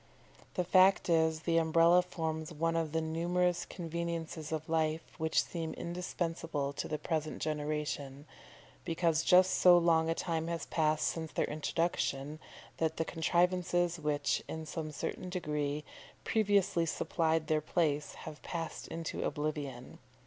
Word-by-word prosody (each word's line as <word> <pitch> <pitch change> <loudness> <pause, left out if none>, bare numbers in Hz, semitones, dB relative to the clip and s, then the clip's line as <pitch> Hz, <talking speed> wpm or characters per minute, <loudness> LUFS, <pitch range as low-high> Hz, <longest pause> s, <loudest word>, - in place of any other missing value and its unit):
The 180 - +1
fact 185 +1 +5
is, 160 -1 +3
the 165 0 +1
Umbrella 165 +2 +5
forms 160 -2 -4
one 165 +1 0
of 165 -2 0
the 160 +1 0
numerous 175 +2 0
conveniences 165 -2 -4
of 155 -1 -3
life 160 0 +1 0.2
which 160 0 +2
seem 165 -2 -5
indispensable 165 -4 -3
to - - -4
the 155 - -2
present 155 0 -2
generation, 150 -2 -3 0.6
because 165 -1 +1
just 185 +1 +6
so 180 -1 +7
long 165 -1 +3
a 165 - +1
time 165 -2 -2
has 170 -1 -3
passed 155 -1 +1
since 160 -1 -3
their - - 0
introduction, 155 -2 -1 0.4
that 160 -1 0
the 160 - 0
contrivances 175 +1 +1
which, 150 -1 0
in 160 0 -5
some 155 0 -5
certain 165 +5 -4
degree, 150 -4 -2 0.4
previously 200 -5 +2
supplied 160 0 0
their 155 0 +1
place, 150 -2 0
have 155 -1 -9
passed 165 -2 -5
into 165 -1 -4
oblivion. 145 -4 -4
160 Hz, 140 wpm, -32 LUFS, 155-170 Hz, 0.6 s, so